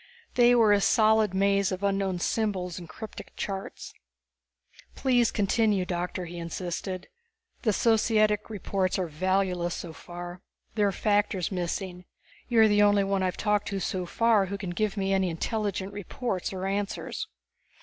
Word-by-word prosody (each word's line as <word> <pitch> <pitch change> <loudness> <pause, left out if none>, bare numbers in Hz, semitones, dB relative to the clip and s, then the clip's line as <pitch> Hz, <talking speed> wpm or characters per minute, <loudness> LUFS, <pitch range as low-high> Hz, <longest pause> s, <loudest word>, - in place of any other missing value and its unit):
They 245 0 +5
were 220 -3 +5
a 200 - +3
solid 220 -1 +4
maze 200 0 +2
of 185 +1 -4
unknown 195 -2 0
symbols 185 -2 -1
and 170 -2 -10
cryptic 220 -1 -9
charts. 195 -1 -5 1.0
"Please 245 -3 +3
continue, 205 -1 +1
Doctor," 180 0 -3
he 175 0 -7
insisted. 175 +2 -4 0.5
"The 220 - +2
societics 215 -1 +2
reports 195 -3 -1
are 185 - 0
valueless 180 +1 0
so 165 -2 -7
far. 175 +1 -8 0.3
There 210 -2 +2
are - - +1
factors 205 -2 +1
missing. 180 0 -3 0.4
You 235 -3 +4
are 220 - +7
the 205 -1 +4
only 205 -1 +5
one 195 0 0
I - - +1
have 180 - -2
talked 210 -1 +1
to 200 -1 -2
so 185 -1 -2
far 220 -1 +3
who 200 +2 -4
can 190 -2 -5
give 210 +3 -1
me 195 0 0
any 190 -1 +2
intelligent 200 +2 -2
reports 205 0 -3
or 190 -1 -4
answers." 205 - -3
195 Hz, 160 wpm, -27 LUFS, 180-210 Hz, 1.0 s, are